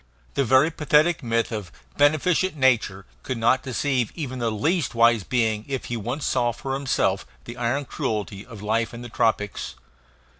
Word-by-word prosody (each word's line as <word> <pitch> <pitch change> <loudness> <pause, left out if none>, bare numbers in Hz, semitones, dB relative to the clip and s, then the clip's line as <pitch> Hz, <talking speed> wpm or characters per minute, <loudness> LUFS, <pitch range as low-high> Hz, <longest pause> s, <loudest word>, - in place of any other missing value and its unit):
The 140 - +1
very 130 +6 +4
pathetic 155 +2 +2
myth 115 -1 0
of 105 -7 -5 0.2
"beneficent 155 +5 +2
nature" 115 -8 +2 0.2
could 130 - -4
not 120 +3 +3
deceive 130 -1 -1
even 130 -6 -5
the 115 -1 0
least 145 - 0
wise 115 -2 +4
being 110 -1 0
if 135 -2 -3
he 120 - -3
once 120 +6 -3
saw 120 -1 +1
for 135 +3 -5
himself 135 -1 0 0.2
the 120 - -8
iron 125 +4 -1
cruelty 105 -5 -3
of 115 -4 -11
life 115 +2 0
in 120 - -8
the 120 - -8
tropics. 110 -3 -1
120 Hz, 165 wpm, -24 LUFS, 115-140 Hz, 0.2 s, very